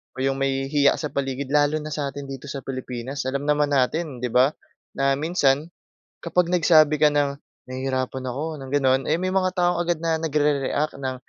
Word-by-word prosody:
o 130 - -3
'yong 135 0 0
may 135 0 -1
hiya 145 -1 +4
sa 150 - -5
paligid, 135 0 -3
lalo 145 0 +3
na 155 - -6
sa 145 -1 -2
atin 140 +1 -6
dito 135 +1 -8
sa 140 -1 -6
Pilipinas. 130 0 -5
Alam 140 +1 -2
naman 150 0 +1
natin, 135 0 -1
'di 125 - -1
ba, 130 +4 +4 0.4
na 135 0 +2
minsan 150 -2 +1 0.5
kapag 175 0 0
nagsabi 155 -4 +4
ka 150 - +6
ng, 140 -1 0 0.3
"Nahihirapan 130 0 -3
ako", 150 +5 -4
ng 135 -1 -9
gano'n, 135 -2 +3
eh, 155 - +2
may 185 +1 -1
mga 185 -1 0
taong 175 -1 +1
agad 175 -2 0
na 165 -1 +1
nagre-react 150 -2 0
ng, 130 -1 -3
140 Hz, 190 wpm, -23 LUFS, 135-155 Hz, 0.5 s, ka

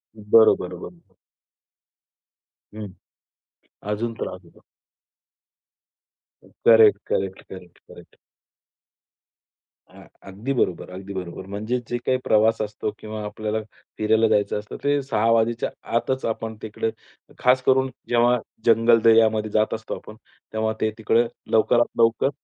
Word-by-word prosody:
बरोबर, 110 -2 +4
बरोबर. 170 - -11 1.6
हं. 110 -1 -6 1.0
अजून 115 +3 -2
त्रास 90 - -5
होतो. 85 - -21 2.1
Correct, 110 -3 +7
correct, 95 -1 -2
correct, 90 -2 -12
correct. - - -16 1.7
हां. - - -16 0.2
अगदी 105 +8 -4
बरोबर. 90 -9 -1
अगदी 95 +2 -8
बरोबर. 90 0 -6
म्हणजे 110 +5 -3
जे 120 - -1
काही 130 - +2
प्रवास 110 +1 +3
असतो 105 0 -3
किंवा 110 0 -7
आपल्याला 110 +1 -3 0.4
फिरायला 110 +1 +3
जायचं 105 -1 +1
असतं 105 - -9
ते 145 0 +2
6:00 115 -4 0
वाजेच्या 115 +1 +1 0.3
आतच 130 +3 0
आपण 110 0 -3
तिकडे 110 +1 -3 0.5
खासकरून 130 +1 +3 0.2
जेव्हा 120 +1 +3 0.3
जंगल 115 0 +5
दऱ्यामध्ये 110 -1 +4
जात 110 +1 +1
असतो 110 0 -5
आपण 105 - -12 0.4
तेव्हा 110 0 0
ते 110 - +1
तिकडे 115 +1 +2 0.3
लवकरात 120 +2 +4
लवकर 115 +3 +3
110 Hz, 115 wpm, -23 LUFS, 105-115 Hz, 2.1 s, Correct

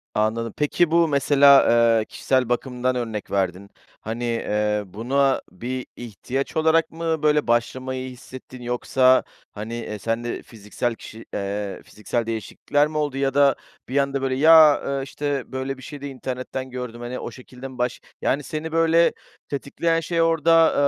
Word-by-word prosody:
Anladım. 110 +1 0
Peki, 155 +3 +1
bu 170 0 +4
mesela, 140 -1 +6 0.3
eee, 110 - -2
kişisel 130 -2 0
bakımdan 125 +1 -1
örnek 115 -4 -4
verdin. 95 0 -1 0.3
Hani, 115 +2 -5
eee, 105 -3 0
buna 130 +8 0
bir 125 +7 -5
ihtiyaç 125 +5 -5
olarak 160 +1 +3
mı 165 -1 -2
böyle 150 -1 +3
başlamayı 130 +2 -1
hissettin 130 0 -11
yoksa, 130 +1 +3 0.3
hani, 110 +2 -7
eee, 105 -3 -5
sen 115 +2 -2
de 120 - -4
fiziksel 115 +2 -4
kişi, 110 0 -11
eee, 100 0 -3
fiziksel 115 +2 -3
değişiklikler 115 +6 0
mi 155 - -5
oldu 145 -3 -1
ya 135 -1 0
da 140 -2 +4 0.3
bir 135 - -1
anda, 140 -1 +1
böyle, 130 -1 0
ya, 155 +1 +7
eee, 140 -1 -2
işte, 140 -1 -4
böyle, 130 0 -3
bir 130 - -13
şeyde 145 +1 -7
internetten 130 0 -5
gördüm, 125 -2 -6
hani, 120 +1 -5
o - - -6
şekilde 125 0 -10
mi 130 -1 -12
baş 125 0 -2 0.2
yani, 140 +2 0
seni 155 +1 -5
böyle 165 +1 +4 0.4
tetikleyen 165 +4 -1
şey 165 +1 -1
orada, 165 0 +4
130 Hz, 160 wpm, -23 LUFS, 115-145 Hz, 0.4 s, ya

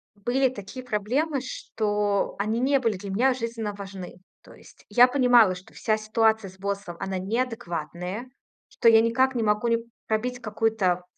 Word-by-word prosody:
были 250 +6 +1
такие 245 +3 -9
проблемы, 255 +7 -1
что 205 -5 -1
они 215 +3 -1
не 275 +2 +3
были 225 -6 0
для 200 +1 -8
меня 250 +7 +2
жизненно 230 -3 -4
важны. 195 -3 -9 0.3
То - - -15
есть - - -18
я 245 +1 +7
понимала, 245 -7 +5
что 180 - -14
вся 215 -1 0
ситуация 220 -1 +1
с 190 +1 -18
боссом- 200 -3 -4
она 190 -1 -3
неадекватная, 195 -1 -3 0.4
что - - 0
я 225 -1 +7
никак 260 +3 +2
не 240 - -1
могу 210 +1 +1
не 230 - +3 0.3
пробить 245 +3 -1
какую-то 215 -5 0
220 Hz, 160 wpm, -25 LUFS, 200-245 Hz, 0.4 s, я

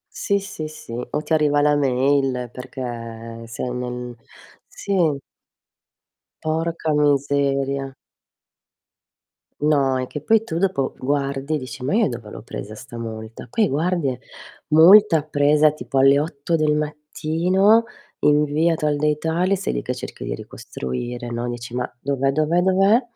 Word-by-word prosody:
Sì, 200 -1 0
sì, 195 -6 -6
sì, 155 -5 -11
o 125 +5 -3
ti 160 - -4
arriva 150 -2 +3
la 150 0 +4
mail 135 -2 +1
perché 115 -3 -7
sei 120 +2 -5
nel 125 0 -5 0.5
sì. 200 - -4 1.5
Porca 160 0 -1
miseria. 140 -1 +1 1.7
No, 140 -3 +2
è 130 - -3
che 150 - -6
poi 225 +6 +3
tu 165 -7 -3
dopo 180 -7 0
guardi 140 +1 -1
e - - +1
dici: 130 -1 -8
"Ma 140 - 0
io 225 -4 +3
dove 115 -4 -7
l'ho - - -9
presa 110 -1 -7
'sta 115 +2 -10
multa?" 110 -1 -7
Qui 225 -4 +1
guardi 165 +2 0
e: 125 -1 -3 0.5
"Multa 165 +2 +7
presa 150 0 +3
tipo 135 -2 -3
alle 135 +1 +6
8 150 +2 -1
del 155 -1 +2
mattino, 165 +8 +2 0.4
in 150 0 +4
via 155 +3 +1
tal 150 -2 0
dei 150 0 +1
tali," 175 +5 +1
sei 60 - -3
lì - - -2
che - - -3
cerchi - - -8
di - - -3
ricostruire, 120 - -6
no, 120 +1 -3
dici: 120 0 -6
"Ma, 125 - -1
dov'è, 135 0 0
dov'è, 155 +4 +2
dov'è." 195 +6 +4
145 Hz, 150 wpm, -22 LUFS, 125-160 Hz, 1.7 s, Multa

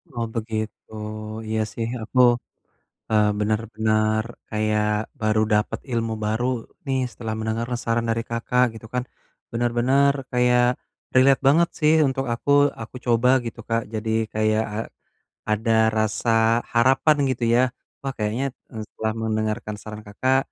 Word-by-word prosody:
Oh 115 -1 -1
begitu, 110 -1 -4 0.6
iya 110 0 -1
sih 115 -1 -3
aku, 125 +4 -2 0.9
eee, 105 -1 +4
benar-benar 110 0 +1 0.3
kayak 105 0 +1 0.4
baru 110 0 +2
dapet 105 +1 +1
ilmu 115 -1 -1
baru 110 +3 0 0.4
nih, 135 -1 0
setelah 110 -2 -5
mendengar 110 +2 -2 0.2
saran 115 0 0
dari 115 0 +1
Kakak, 125 +2 +2
gitu 110 0 -10
kan. 125 0 0 0.5
Benar-benar 120 +4 +2 0.2
kayak 125 0 +3 0.5
relate 135 +1 +5
banget 170 +4 +5
sih 155 0 +4
untuk 135 0 -2
aku 140 +4 -2 0.3
aku 115 - -9
coba 120 +1 +3 0.2
gitu 115 - -6
Kak, 115 0 +1
jadi 110 +1 -3 0.2
kayak 110 0 +2
a - - -3 0.7
ada 110 +2 +1 0.3
rasa 110 +2 -1 0.5
harapan 135 +6 +4
gitu 120 -2 -1
ya. 120 - +5 0.4
Wah 135 -1 -3
kayaknya, 110 +5 -1 0.3
e - - -14
setelah 110 0 -3
mendengarkan 110 0 -2
saran 105 0 -8
Kakak, 130 +6 +1
115 Hz, 135 wpm, -23 LUFS, 110-125 Hz, 0.9 s, relate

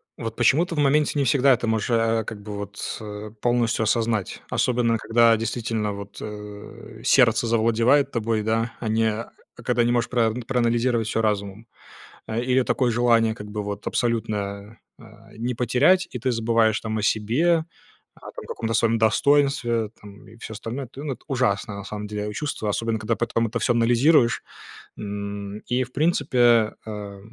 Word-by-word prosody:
Вот 115 -2 -6
почему-то 170 +9 +2
в - - -2
моменте 145 +1 +3
не 140 - +2
всегда 135 +1 +4
это 120 -1 -1
можешь, 110 +1 0
а, 115 -1 +2
как 105 -1 -8
бы 105 0 -8
вот, 100 +1 -5
э, 105 0 -7
полностью 120 -2 +1
осознать, 110 -2 -1
особенно 120 -2 +1
когда 115 +1 +4
действительно 115 -1 -2
вот, 100 0 -9
э, 105 -1 -9
сердце - - +4
завладевает 115 +5 +3
тобой, 115 -1 -1
да, 115 +2 -1
а 115 - -4
не 110 +1 +1 0.5
а - - -11
когда 120 - +2
не 120 - +1
можешь 120 -1 0
прав 115 -3 +1
проанализировать 120 -2 +1
всё 115 0 0
разумом. 105 +1 -2 0.6
Э, 110 +1 -2
или 130 +1 +2
такое 125 0 +1
желание 115 -1 +3
как 105 -2 -9
бы 105 0 -3
вот 100 0 -6
абсолютно, 105 -3 -2 0.2
а, 110 0 -17
не 120 +2 -2
потерять, 125 +11 +3
и 125 - -5
ты 130 +2 -1
забываешь, 115 -1 +2
там, 110 -1 -4
о 105 - -3
себе, 150 +12 +2 0.5
о - - -20 0.2
там - - -8
каком-то 115 0 -3
своем 115 +1 +2
достоинстве, 120 -1 +2
там, 100 -2 -14
и 110 - -15
всё 110 - -8
остальное. 115 +5 -6
Ну 140 - -7
эт - - -7
ну 135 - -1
это - - -16
ужасно, 110 -6 0
на 100 - -7
самом 105 0 -6
деле, 105 0 -4
а 105 - -6
чувство, 145 -5 -4
особенно 115 +1 -1
когда 110 +1 -1
потом 115 -1 0
это 115 +2 -3
всё 120 - +2
анализируешь 120 +2 +3 0.5
н 100 0 -5
и, 125 +1 0
в 125 - -17
принципе, 125 -8 +3
а 105 -2 -7
115 Hz, 180 wpm, -24 LUFS, 105-120 Hz, 0.6 s, всегда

